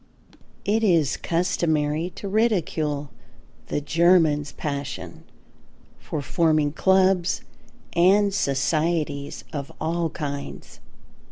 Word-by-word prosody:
It 220 +3 +1
is 165 - +3
customary 160 -2 0
to 200 - -6
ridicule 165 - 0 0.6
the - - -1
Germans' 160 -2 +3
passion 140 - -5 0.8
for 150 - -5
forming 155 -2 +2
clubs, 190 +1 +2 0.5
and 195 +3 +4
societies 150 -1 -1
of 140 -2 -5
all 165 +1 -1
kinds. 140 -3 -6
160 Hz, 85 wpm, -24 LUFS, 145-180 Hz, 0.8 s, and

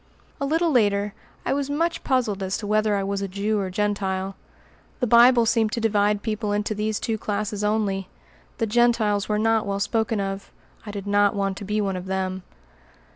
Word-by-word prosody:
A 280 - -1
little 325 +3 +2
later, 205 -5 +2 0.3
I - - +1
was 280 0 -1
much 330 +4 -1
puzzled 240 -7 0
as 190 0 -1
to 210 - -6
whether 215 0 +2
I 200 - 0
was 200 0 -2
a 200 - -2
Jew 205 +3 -1
or 190 -2 -2
Gentile. 195 -1 -1 0.6
The 250 - +1
Bible 235 +1 +6
seemed 225 -1 +2
to 240 - -1
divide 210 -2 +1
people 215 -2 -2
into 210 +1 -1
these 215 0 -1
two 225 -2 -2
classes 210 0 -2
only. 205 -3 0 0.5
The 225 - 0
Gentiles 220 -3 +2
were 210 - +1
not 220 0 +2
well 200 0 -1
spoken 220 +1 0
of: 195 0 -4 0.4
I - - -4
did 205 -1 -6
not 205 0 +3
want 195 -1 -1
to 200 - -7
be 210 +2 -1
one 195 -2 -1
of 180 0 -6
them. 190 0 -2
210 Hz, 195 wpm, -24 LUFS, 200-225 Hz, 0.6 s, Bible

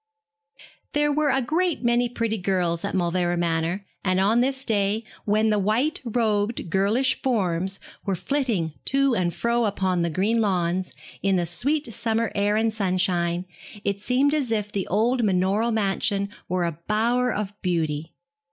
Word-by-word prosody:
There 295 0 +2
were 300 0 +2
a 270 -1 +2
great 335 +4 0
many 240 0 +2
pretty 230 -2 -2
girls 180 -3 0
at - - -2
Mauleverer 175 -1 +1
Manor, 170 +3 -1 0.2
and 185 -1 +1
on 215 +5 +3
this 265 +1 0
day, 210 0 +1 0.2
when 215 +1 +2
the 210 - +2
white 245 - +1
robed 220 -5 0
girlish 210 +7 +2
forms 190 -6 0 0.2
were 195 - -1
flitting 220 - -1
to 275 -1 +2
and 180 -6 +1
fro 235 +6 0
upon 190 -3 0
the 170 - +1
green 205 +8 +1
lawns, 185 -2 0 0.3
in 195 -1 +2
the 175 -1 +1
sweet 245 - 0
summer 225 0 0
air 205 +1 +1
and 220 0 +1
sunshine, 180 -3 0 0.4
it 200 0 -1
seemed 265 +6 +2
as 280 -6 0
if 210 -2 -1
the 195 -2 -2
old 235 +5 +1
manorial 195 +3 +2
mansion 200 -2 0 0.2
were 180 -1 0
a 170 -1 -4
bower 240 +4 +2
of 205 -1 -3
beauty. 160 -3 -2
205 Hz, 160 wpm, -24 LUFS, 185-235 Hz, 0.4 s, on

